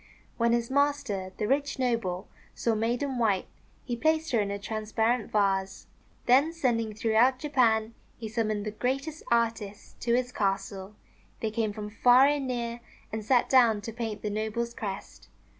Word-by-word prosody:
When 235 0 +2
his 235 +1 0
master, 275 -9 0
the 210 - -1
rich 280 +3 0
noble, 230 -7 -1 0.3
saw 230 - 0
Maiden 240 +4 -1
White, 205 -5 +2 0.4
he 245 - -2
placed 315 +5 +1
her 235 - +3
in 205 -1 0
a 200 - -2
transparent 220 +3 -1
vase. 195 -2 0 0.4
Then 270 +6 +5
sending 230 -9 0
throughout 230 +4 +3
Japan, 235 -6 +2 0.2
he 225 - -6
summoned 215 -1 -1
the 215 - -2
greatest 275 +8 -2
artists 225 -3 -1
to 235 0 +1
his 250 0 0
castle. 195 -1 -2 0.5
They 220 - -1
came 220 -1 -1
from 210 0 -7
far 245 +4 +6
and 285 -2 +1
near, 235 -1 -3 0.3
and 220 0 -3
sat 245 +2 +3
down 235 -5 +4
to 225 +2 -6
paint 225 -3 -4
the 210 - -2
noble's 220 +3 -2
crest. 200 -3 -7
230 Hz, 160 wpm, -28 LUFS, 210-250 Hz, 0.5 s, far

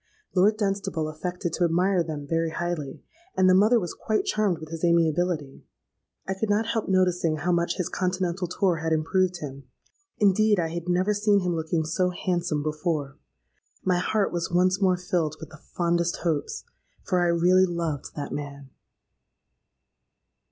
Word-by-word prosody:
Lord 200 +3 +4
Dunstable 195 -6 -1
affected 175 +2 -4
to 180 - 0
admire 180 +2 +2
them 155 -3 -4
very 165 +2 0
highly; 160 -5 -4 0.3
and 185 - +5
the 185 - +6
mother 215 +6 +5
was 175 -5 -4
quite 220 - -1
charmed 210 - +1
with 155 -1 -10
his 165 +1 -7
amiability. 170 -3 +1 0.6
I 190 - 0
could 210 +3 -3
not 210 +2 +2
help 225 -2 -2
noticing 180 -4 +2
how 155 +4 -1
much 170 0 +1
his 180 - -1
continental 180 -1 -1
tour 180 0 +1
had 160 0 -1
improved 175 +3 +1
him; 135 -2 -7 0.5
indeed, 210 -1 +3
I 165 -1 0
had 170 +1 -5
never 185 +4 +2
seen 205 -1 +2
him 180 -1 0
looking 160 0 -1
so 180 +3 +1
handsome 175 -4 -1
before: 150 -2 -2 0.7
my 180 -1 +2
heart 205 +2 0
was 170 -1 -2
once 185 +2 +2
more 185 -2 +3
filled 175 -4 -1
with - - -9
the 155 - -13 0.2
fondest 170 0 +1
hopes;—for 170 +2 -3
I 175 - +3
really 180 +2 +4
loved 165 -5 -4
that 145 -1 -5
man. 140 -2 -7
175 Hz, 160 wpm, -26 LUFS, 160-185 Hz, 0.7 s, the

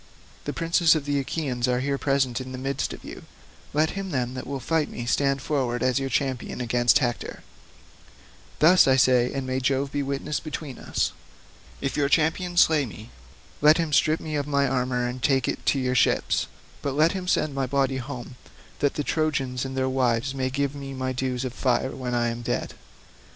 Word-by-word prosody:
The - - -2
princes 165 0 +3
of 150 -3 -2
the 145 -1 0
Achaeans 135 -3 -2
are 125 0 +1
here 140 +1 -1
present 135 -3 +1
in 130 0 -7
the - - -5
midst 135 +1 -2
of - - -9
you; - - -9 0.5
let 155 +2 +2
him, 195 -1 -5
then, 125 -5 -1
that 130 - -6
will 140 0 -3
fight 160 +3 0
me 120 - -6
stand 140 +2 +1
forward 130 -5 -1
as 130 +1 +2
your 135 0 -2
champion 130 -3 -2
against 120 0 +3
Hector. 120 -3 -3 1.1
Thus 175 +2 +6
I 130 - +5
say, 125 -1 +4
and 135 -1 -3
may 130 0 -1
Jove 135 +1 0
be 145 - -1
witness 140 +2 -2
between 150 -3 -6
us. - - -1 0.7
If 140 - -2
your 140 -1 +2
champion 175 +3 +1
slay 155 -5 +5
me, 110 +1 -11 0.5
let 150 +2 +7
him 165 -3 -1
strip 155 +2 +3
me 155 - -6
of 145 -1 -1
my 140 -1 +2
armour 125 -1 0
and 125 +1 -5
take 135 0 +2
it - - -3
to - - +3
your 125 -1 0
ships, 125 - +2 0.3
but 140 -1 -2
let 155 +3 +4
him 185 -2 -5
send 155 -5 +1
my 135 -1 -1
body 135 0 +1
home 125 -1 -7 0.4
that 145 0 +1
the 150 - -1
Trojans 135 -5 -1
and 135 0 -5
their 130 0 +1
wives 130 0 +1
may 130 -1 -1
give 140 +1 -1
me 135 -1 -7
my 130 0 -2
dues 130 0 -2
of 125 - -4
fire 130 0 0
when 125 -2 -3
I 120 0 +1
am 115 +1 -5
dead. 120 - -2
135 Hz, 205 wpm, -25 LUFS, 125-145 Hz, 1.1 s, let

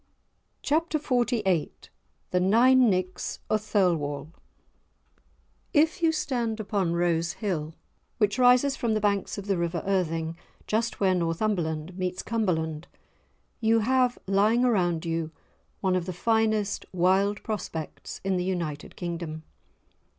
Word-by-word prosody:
*Chapter 315 +1 +1
XLVIII* 235 - +1 0.6
*The 180 - +2
Nine 240 +6 +5
Nicks 185 -1 -2
o' 215 - +4
Thirlwall* 165 -8 0 1.4
If 315 +4 +3
you 330 -1 +4
stand 240 -7 -2
upon 200 -5 -1
Rose 170 -1 +1
Hill, 165 -7 -3 0.4
which 210 +1 +1
rises 250 +2 +5
from 230 -4 0
the - - +1
banks 205 -1 0
of 200 - -6
the 195 -3 0
river 170 -1 -2
Irthing 165 -4 0 0.3
just 225 +2 -1
where 190 -2 +3
Northumberland 170 -1 -1
meets 185 0 -2
Cumberland, 170 -8 -1 0.7
you 225 0 +3
have 255 +2 +2
lying 210 +5 +3
around 175 -8 +1
you 165 -1 -2 0.5
one 190 -2 +2
of 180 -1 -1
the 185 - -3
finest 220 +1 +1
wild 190 +3 +2
prospects 165 -7 -5
in 195 -1 0
the 180 - -1
United 170 -6 -3
Kingdom. 170 -3 -5
195 Hz, 125 wpm, -27 LUFS, 170-225 Hz, 1.4 s, Nine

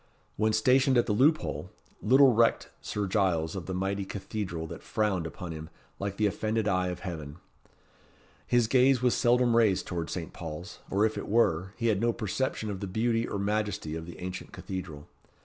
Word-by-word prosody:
When 110 +1 +2
stationed 130 +4 +4
at 120 - +4
the 105 - 0
loophole, 150 +8 +2 0.3
little 130 +3 +6
recked 115 +1 +2
Sir 105 -1 -2
Giles 90 -5 +1
of 95 - -5
the 95 - -3
mighty 95 +2 -1
cathedral 95 -4 -4
that - - -8
frowned 95 -6 -1
upon 90 +1 -7
him 80 0 -7 0.3
like 100 0 -3
the 105 - +2
offended 110 +1 0
eye 95 -2 +1
of 90 -1 -4
heaven. 80 -5 -6 1.1
His 120 -1 +3
gaze 130 +2 +4
was 125 - +4
seldom 120 -1 +3
raised 110 -5 +3
towards 85 -2 -4
Saint 85 -3 -5
Paul's, 85 +5 -7
or 100 +2 +3
if 110 - -1
it - - -6
were, 95 -4 +2
he 115 - -3
had 105 -2 +1
no 120 0 +2
perception 110 0 -2
of 95 - -5
the 100 - -4
beauty 115 +4 0
or - - -3
majesty 100 -5 -1
of 80 0 -6
the 85 - -9
ancient 90 +1 -6
cathedral. 90 -6 -7
100 Hz, 185 wpm, -29 LUFS, 90-115 Hz, 1.1 s, little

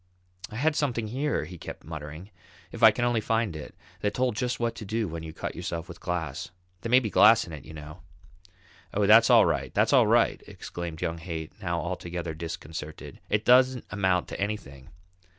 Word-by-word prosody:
"I - - -9
had 150 +6 +1
something 120 -7 -1
here," 140 +6 -1
he 90 -2 -10
kept - - -8
muttering, 80 +4 -8 0.4
"if - - -9
I - - +10
can 120 - -1
only 120 -2 +1
find 110 -4 0
it, 75 - -8 0.2
that 105 0 -1
told 125 -3 +1
just 125 +1 -2
what 115 -1 0
to - - -6
do 110 +1 -1
when 85 -1 -5
you 80 -1 -7
cut - - -5
yourself 85 -1 -4
with 85 - -10
glass. 85 -6 -3 0.3
There 115 - -4
may 125 +2 +7
be 110 -5 -4
glass 110 +2 +6
in 85 - -10
it, 75 - -9
you 80 - -10
know." 75 +3 -10 0.9
"Oh, 105 0 +2
that's 110 +3 +7
all - - +7
right, - - -1
that's - - +3
all - - +6
right," - - +3
exclaimed 85 -2 -6
young 80 0 -2
Haight, 80 -2 -6
now 85 -3 -1
altogether 85 -1 -4
disconcerted. 80 -1 -7
"It 105 +1 0
don't 130 0 +5
amount 95 -3 +1
to - - -6
anything." 80 -10 -5
95 Hz, 200 wpm, -27 LUFS, 80-115 Hz, 0.9 s, I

